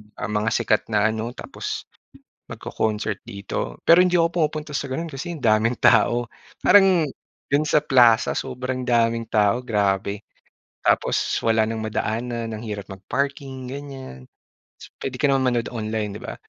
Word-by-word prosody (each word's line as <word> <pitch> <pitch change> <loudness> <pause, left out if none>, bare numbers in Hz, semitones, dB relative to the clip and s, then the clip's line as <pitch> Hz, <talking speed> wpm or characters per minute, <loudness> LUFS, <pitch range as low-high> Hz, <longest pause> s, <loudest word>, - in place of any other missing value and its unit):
ah, - - -4
mga 105 +1 0
sikat 115 -2 +1
na 110 0 +2
ano 115 +3 -4
tapos - - -6 0.6
magco-concert 105 -2 -3
dito. 100 -11 -5
Pero 175 +2 +6
hindi 180 -2 +3
ako 165 - +2
pumupunta 155 -1 -1
sa 140 - -3
gano'n 160 +5 -4
kasi 150 +5 -5
ang 155 - -9
daming 115 +1 +2
tao 120 +1 +4 0.3
parang 185 -6 +5 0.4
do'n 145 +2 +2
sa 150 - +3
Plaza 125 -5 +4
sobrang 130 0 -4
daming 115 -1 +2
tao 110 +3 +1
grabe. 100 -2 0 0.6
Tapos - - +2 0.2
wala 110 -1 +3
nang 110 0 -3
madaanan 115 +1 -3
ang 110 - -6
hirap 105 -3 -5
mag-parking 135 - -4
ganyan. 130 - -8 0.5
So - - -13
pwede 130 - -4
ka 140 +2 +2
naman 135 -1 +2
manood 115 -1 -1
online, 110 -3 -3
'di - - -8
ba? - - -6
120 Hz, 155 wpm, -23 LUFS, 110-135 Hz, 0.6 s, Pero